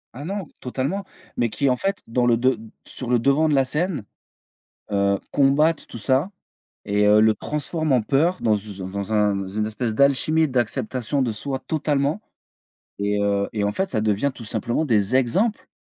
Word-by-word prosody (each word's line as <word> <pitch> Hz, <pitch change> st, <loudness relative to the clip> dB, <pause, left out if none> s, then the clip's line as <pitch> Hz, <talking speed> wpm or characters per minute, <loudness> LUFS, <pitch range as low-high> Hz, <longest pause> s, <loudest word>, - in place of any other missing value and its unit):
Ah 145 Hz, -, -7 dB
non, 195 Hz, 0 st, -3 dB, 0.2 s
totalement, 135 Hz, +10 st, -3 dB, 0.3 s
mais 120 Hz, -, +1 dB
qui 140 Hz, +5 st, 0 dB
en -, -, +2 dB
fait 195 Hz, +10 st, -2 dB
dans 120 Hz, +1 st, +1 dB
le 115 Hz, -1 st, +4 dB
de 130 Hz, -1 st, +2 dB, 0.3 s
sur 125 Hz, -2 st, -5 dB
le 125 Hz, -, +4 dB
devant 140 Hz, +6 st, +3 dB
de 145 Hz, -, +2 dB
la 135 Hz, -1 st, +3 dB
scène, 150 Hz, -, -2 dB, 0.9 s
heu, 100 Hz, 0 st, +2 dB
combattent 145 Hz, +3 st, +3 dB
tout -, -, -9 dB
ça 130 Hz, -, +1 dB, 0.5 s
et 105 Hz, 0 st, +2 dB
heu, 105 Hz, +1 st, +6 dB
le 110 Hz, 0 st, +4 dB
transforment 150 Hz, +5 st, -3 dB
en 125 Hz, -4 st, +3 dB
peur 160 Hz, +10 st, +1 dB
dans, 110 Hz, -2 st, +3 dB
heu, 100 Hz, -1 st, -6 dB
dans 95 Hz, -, -5 dB
u -, -, -5 dB
d -, -, -11 dB
dans 100 Hz, +2 st, -4 dB
un 105 Hz, -1 st, +3 dB
dans 100 Hz, -1 st, -3 dB
une 105 Hz, +2 st, -2 dB
espèce 110 Hz, +1 st, -3 dB
d'alchimie 140 Hz, +5 st, +3 dB
d'acceptation 125 Hz, +1 st, -1 dB
de 120 Hz, -3 st, 0 dB
soi 135 Hz, +5 st, -4 dB
totalement 150 Hz, +2 st, 0 dB, 0.8 s
et 100 Hz, 0 st, 0 dB
heu 100 Hz, 0 st, +1 dB
et 105 Hz, -2 st, -2 dB
en 100 Hz, -, +1 dB
fait 190 Hz, -, -2 dB
ça 110 Hz, -, -1 dB
devient 110 Hz, +6 st, +1 dB
tout 115 Hz, -, -10 dB
simplement 120 Hz, +7 st, -1 dB
des 110 Hz, -3 st, +1 dB
exemples 185 Hz, -, +1 dB
125 Hz, 195 wpm, -23 LUFS, 105-145 Hz, 0.9 s, heu